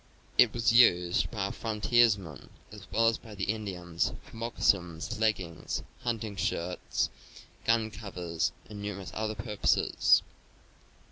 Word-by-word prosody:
It 120 - +6
was 115 -1 +2
used 90 -8 +5
by 105 -4 -3
our 100 - -2
frontiersmen, 105 - +1 0.2
as 105 -2 -11
well 115 +1 +3
as 115 - +2
by 110 -2 -11
the 95 - -4
Indians, 95 -6 -2
for - - -15
moccasins, 100 -3 0
leggings, 95 -7 -1 0.2
hunting 115 -4 -3
shirts, 90 0 -1 0.5
gun 115 -1 +2
covers 90 -5 -3 0.2
and 105 -1 -8
numerous 100 -2 -5
other 110 0 -2
purposes. 105 0 +2
105 Hz, 125 wpm, -30 LUFS, 90-115 Hz, 0.5 s, It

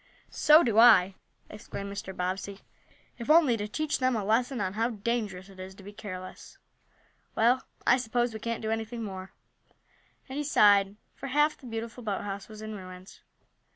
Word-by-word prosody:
"So 310 +2 +6
do 225 -2 +2
I!" 200 -5 +7 0.3
exclaimed 200 -1 -7
Mr. 200 -1 -6
Bobbsey. 190 +2 -4 0.6
"If 235 - -7
only 305 -6 +6
to 210 -1 -4
teach 305 +7 -2
them 255 -1 +1
a 215 - -1
lesson 240 +4 +1
on 190 -2 -2
how 225 +3 0
dangerous 210 -4 -3
it 195 -1 -15
is 190 +1 -8
to 195 - -14
be 205 +2 -10
careless. 185 -3 -9 0.8
Well, 240 +3 +3 0.2
I 245 - +5
suppose 240 -1 -1
we 220 - -6
can't 230 +1 -4
do 220 - -1
anything 225 +1 -3
more," 190 -2 -7 1.0
and 270 +2 -5
he - - -1
sighed, 205 -7 +4 0.2
for 275 - -8
half 295 +3 +2
the 255 - -13
beautiful 225 +1 -6
boathouse 200 -1 -4
was 215 0 -10
in 215 0 -6
ruins. 185 -1 -11
220 Hz, 175 wpm, -28 LUFS, 195-240 Hz, 1.0 s, I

